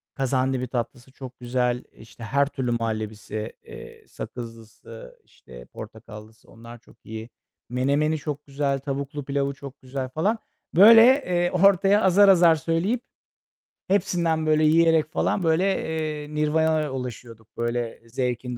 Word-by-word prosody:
kazandibi 130 -1 -1
tatlısı 120 +1 -5
çok 130 -2 -11
güzel, 125 0 -1
işte, 115 +1 -14
her 140 +4 +1
türlü 130 -4 -3
muhallebisi, 110 -1 -4
eee, - - -13
sakızlısı, 115 -1 -10
işte, - - -15
portakallısı, 105 +1 -12
onlar 115 +1 -12
çok 115 - -22
iyi. 110 +1 -8 0.4
Menemeni 140 +5 0
çok 145 0 -6
güzel. 140 -1 -1
Tavuklu 140 +1 -5
pilavı 140 0 -1
çok 140 -1 -12
güzel 130 0 -5
falan. 205 - -1 0.4
Böyle, 225 +5 +9 0.2
eee, 175 -1 0
ortaya 195 +2 +4
azar 195 +2 +5
azar 170 -3 +6
söyleyip 170 - -1 0.9
hepsinden 170 -4 0
böyle 155 0 +2
yiyerek 160 0 +4
falan, 190 - 0
böyle, 165 +3 +2 0.6
eee, 150 +1 -10
nirvanaya 155 -1 +1
ulaşıyorduk, 120 -3 -8
böyle, 120 0 -3
zevkin 125 0 -3
135 Hz, 125 wpm, -24 LUFS, 120-160 Hz, 0.9 s, Böyle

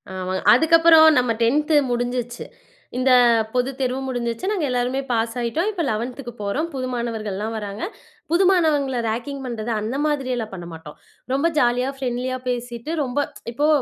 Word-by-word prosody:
ஆமாங்க. 185 0 -3
அதுக்கப்புறம் 320 +3 +6
நம்ம 250 -2 +1
10த் 300 +7 +2 0.2
முடிஞ்சிருச்சு. 245 0 -2 0.5
இந்த 255 +1 +2 0.4
பொதுத்தேர்வும் 260 +1 -1
முடிஞ்சிருச்சு. 245 - -2
நாங்க 370 -8 0
எல்லாருமே 250 +2 0
பாஸ் 230 -1 0
ஆயிட்டோம். 300 - -1
இப்ப 380 -5 -3
11துக்கு 240 +3 -4
போறோம். 235 +11 -1
புது 255 -1 -3
மாணவர்கள்லாம் 220 -3 -3
வராங்க. 205 0 -6 0.5
புது 345 +3 +4
மாணவங்கள 290 -8 +2
ரேக்கிங் 245 +5 -3
பண்றது, 235 -2 -4
அந்த 220 +5 -3
மாதிரில்லாம் 255 -7 -2
பண்ண 175 -2 -7
மாட்டோம். 160 -2 -10 0.4
ரொம்ப 280 +5 +2
ஜாலியா, 250 -1 +2
ஃப்ரெண்ட்லியா 255 0 -2
பேசிட்டு, 240 +2 -4
ரொம்ப 260 +1 -2 0.3
இப்போ 290 +5 0
250 Hz, 140 wpm, -22 LUFS, 230-275 Hz, 0.5 s, அதுக்கப்புறம்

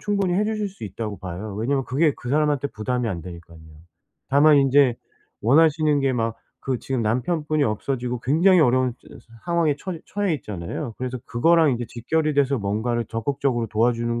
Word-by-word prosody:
충분히 200 -3 0
해 205 - +2
주실 215 -1 -2
수 190 - -10
있다고 105 0 -5
봐요. 95 +3 -6
왜냐하면 135 +5 0
그게 145 +3 +2
그 120 - -8
사람한테 145 -1 +1
부담이 125 +2 -2
안 90 -5 -3
되니깐요. 85 -2 -11 0.7
다만 145 +2 +6
인제 135 -2 +4 0.5
원하시는 150 +3 +4
게 135 -1 +1
막 115 -1 -1 0.2
그 130 -2 -2
지금 130 0 -3
남편분이 150 +6 0
없어지고 125 +2 -2
굉장히 170 +8 +4
어려운 130 -2 +3
저 - - -19 0.4
상황에 170 -4 +2
처 185 - -5
처해 200 -5 -1
있잖아요. 105 - -5
그래서 130 0 -3
그거랑 160 +5 +3
인제 120 -1 -3
직결이 155 +6 -1
돼서 140 -1 +2
뭔가를 110 +3 -1
적극적으로 120 +1 -2
도와주는 120 +1 0
130 Hz, 395 characters per minute, -23 LUFS, 115-155 Hz, 0.7 s, 다만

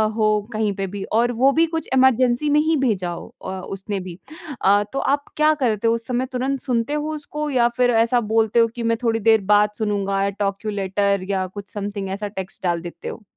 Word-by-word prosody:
हो 215 -1 +2
कहीं 215 -1 0
पे 195 0 -3
भी 195 +1 -6 0.2
और 240 +1 +2
वो 270 +1 +6
भी 325 +4 +3
कुछ 320 - -3
इमरजेंसी 255 +1 +3
में 295 +1 +4
ही 315 +1 +2
भेजा 210 -10 0
हो 170 - -7 0.2
अ, - - -4
उसने 195 +2 -5
भी। 180 -2 -8 0.4
अ, 205 +1 +4
तो 275 - -1
आप 285 +1 0
क्या 305 0 +4
करते 225 -2 +1
हो 230 - +4
उस 230 0 -4
समय 250 0 0
तुरंत 265 +2 -1
सुनते 245 +1 -1
हो 300 +1 -2
उसको 300 0 -5
या 245 -4 +3
फिर 250 -1 +4
ऐसा 245 +1 +2
बोलते 225 0 +3
हो 230 - +5
कि 240 - -4
मैं 230 0 +1
थोड़ी 225 -1 +1
देर 220 0 +4
बाद 210 0 +5
सुनुँगा, 200 -2 -1
आई 200 +1 +1
टॉक 200 +1 -2
यू 215 - -1
लेटर 200 -1 0
या 190 -1 0
कुछ 200 +2 -9
समथिंग 200 -1 -4
ऐसा 210 0 -4
टेक्स्ट 190 -2 -8
डाल 175 -2 0
देते 175 0 -9
हो? 225 - -7
220 Hz, 230 wpm, -22 LUFS, 200-255 Hz, 0.4 s, वो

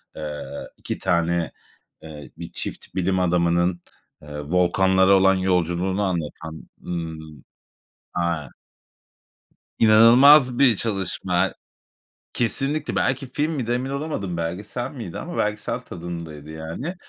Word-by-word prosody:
eee, 75 -1 -5 0.3
2 - - -5
tane, 85 -4 0 0.5
eee, 75 -2 -10
bir - - -8
çift - - -7
bilim 95 0 +1
adamının, 85 0 +1 0.4
eee, 75 0 -8
volkanlara 95 +4 +3
olan 95 0 +5
yolculuğunu 95 +1 0
anlatan, 80 -3 -4
ımm, 80 -4 -6 0.7
aaa 85 -4 -1 1.3
inanılmaz 125 +4 +7
bir 130 -5 +6
çalışma. 95 -3 -1 0.8
Kesinlikle! 135 +6 0
Belki 135 0 -1
film 150 +2 0
miydi? 130 -7 -3
Emin 125 +2 -1
olamadım. 140 - -3
Belgesel 100 +9 -4
miydi? 115 -11 -7
Ama 175 +1 -6
belgesel 105 0 -1
tadındaydı 85 -3 -8
yani. 80 - -5
90 Hz, 105 wpm, -23 LUFS, 85-115 Hz, 1.3 s, inanılmaz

